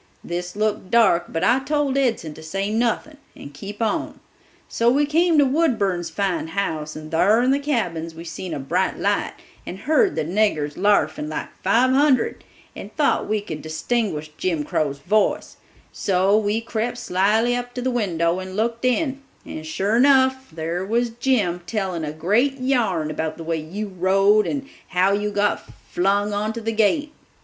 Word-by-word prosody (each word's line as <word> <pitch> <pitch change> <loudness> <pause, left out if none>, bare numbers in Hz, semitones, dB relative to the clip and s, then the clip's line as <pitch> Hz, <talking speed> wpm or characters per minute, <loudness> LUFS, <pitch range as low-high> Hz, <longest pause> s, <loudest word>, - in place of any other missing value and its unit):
This 175 +1 -5
looked 210 -3 -1
dark, 225 -7 +4
but 165 +2 -2
I 240 +6 +4
told 285 0 0
Edson 230 - 0
to 160 - -12
say 195 +6 -3
nothin' 240 +7 -1 0.2
and 140 - -11
keep 205 +9 -6
on; 215 - -2 0.5
so 230 +1 +2
we 285 +4 +3
came 325 +2 +2
to 290 - +6
Woodburn's 220 - +1
fine 195 -5 -1
house, 160 -4 -3
and 155 0 -9
thar 205 +8 +4
in 255 - +3
the 275 - +2
cabins 175 - -2
we 165 - -8
seen 170 +2 -6
a - - -3
bright 135 - -1
light, - - 0 0.3
and 180 - -7
heard 315 - +2
the - - 0
niggers 165 -5 0
larfin 155 -7 +1
like 155 - -4
five 235 +7 +3
hundred, 270 -2 +2 0.3
and - - -8
thought - - +1
we 215 -1 +1
could 155 -7 -7
distinguish 155 0 -2
Jim 165 -5 0
Crow's 145 -1 -1
voice; 205 +8 0 0.3
so 195 +1 +2
we 215 +1 +1
crept 230 +1 -3
slyly 220 +5 +1
up 245 0 -5
to 250 - -3
the 260 - 0
window 175 -7 0
and 185 0 -7
looked 230 +2 -1
in 270 +2 0 0.2
and, 155 0 -7
sure 195 +7 0
enough, 265 0 +4
there 165 +3 -3
was 230 +4 0
Jim, 225 -8 0
telling 190 -7 -2
a 150 - -3
great 215 - +1
yarn 225 - 0
about 155 0 -3
the 165 - -7
way 165 0 -1
you 180 +8 -5
rode 195 +3 +3
and 275 -1 -3 0.2
how 185 +1 +2
you 205 +1 0
got 205 0 0 0.3
flung 200 +3 +1
onto 215 +3 -2
the 225 0 -2
gate. 290 +8 +1
205 Hz, 175 wpm, -22 LUFS, 170-245 Hz, 0.5 s, to